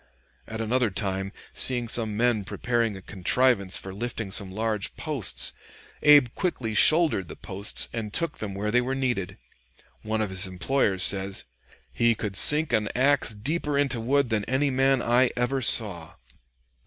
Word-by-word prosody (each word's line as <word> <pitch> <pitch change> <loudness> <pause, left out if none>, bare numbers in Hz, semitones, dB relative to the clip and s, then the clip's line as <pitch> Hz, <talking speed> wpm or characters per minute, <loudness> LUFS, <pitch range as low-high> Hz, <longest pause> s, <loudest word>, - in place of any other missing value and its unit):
At 110 0 -7
another 120 +1 -1
time, 95 -1 -4 0.2
seeing 120 -2 +1
some 110 -2 +1
men 120 -3 0
preparing 115 0 -3
a 95 - -14
contrivance 100 +1 0
for 95 - -9
lifting 115 -1 -6
some 100 -1 +2
large 110 0 -3
posts, 145 - +2 0.5
Abe 145 -4 +5
quickly 130 - -4
shouldered 155 - +4
the - - -10
posts 100 +2 +1
and 110 -3 -6
took 170 +6 -2
them 100 -3 -6
where 105 +2 -4
they 125 +2 +2
were 130 +2 -4
needed. 120 -9 -4 0.6
One 110 0 -3
of 100 - -6
his 95 0 -3
employers 95 +1 -1
says, 95 0 +2 0.5
"He 115 0 +1
could 105 -2 -6
sink 150 +8 +4
an 105 -1 0
axe 130 -3 +1
deeper 145 +6 -3
into 135 -5 -1
wood 140 +2 0
than 105 -2 -1
any 135 +3 -1
man 135 0 0
I 120 +2 +2
ever 125 +2 -2
saw." 95 -9 +4
115 Hz, 160 wpm, -24 LUFS, 100-130 Hz, 0.6 s, Abe